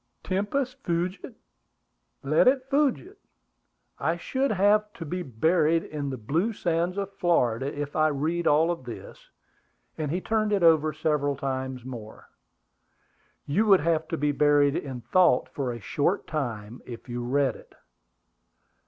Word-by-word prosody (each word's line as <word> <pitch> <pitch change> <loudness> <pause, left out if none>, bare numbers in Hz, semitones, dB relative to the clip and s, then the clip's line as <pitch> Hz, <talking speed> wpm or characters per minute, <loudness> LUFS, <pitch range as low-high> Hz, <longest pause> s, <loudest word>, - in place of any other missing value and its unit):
Tempus 205 +8 -1
fugit. 175 +2 -3 0.9
Let 150 - +3
it 260 0 +4
fugit! 295 - 0 0.8
I 165 +1 0
should 265 +10 -1
have 210 +1 +3
to 175 -8 -8
be 180 +4 -3
buried 160 +4 +2
in 145 -2 -5
the 130 - -4
blue 165 - -1
sands 175 0 -1
of 200 0 -3
Florida 135 -9 +1
if 145 0 -4
I 155 0 +4
read 155 +4 -1
all 160 +4 +3
this;" 125 -7 -11 0.7
and 155 -2 -2
he 175 +5 -1
turned 215 +1 0
it 195 -3 +1
over 155 -2 +5
several 150 -2 0
times 130 -2 -4
more. 115 -4 -9 1.2
"You 205 +10 +1
would 195 -3 +6
have 160 0 0
to 165 - -3
be 150 0 +1
buried 145 0 +3
in 130 -4 -4
thought 175 -4 +3
for 130 -1 -3
a 120 - -6
short 150 - -1
time 120 -7 -4
if 120 0 -9
you 120 0 -4
read 135 +2 +1
it." - - -16
155 Hz, 145 wpm, -26 LUFS, 135-185 Hz, 1.2 s, would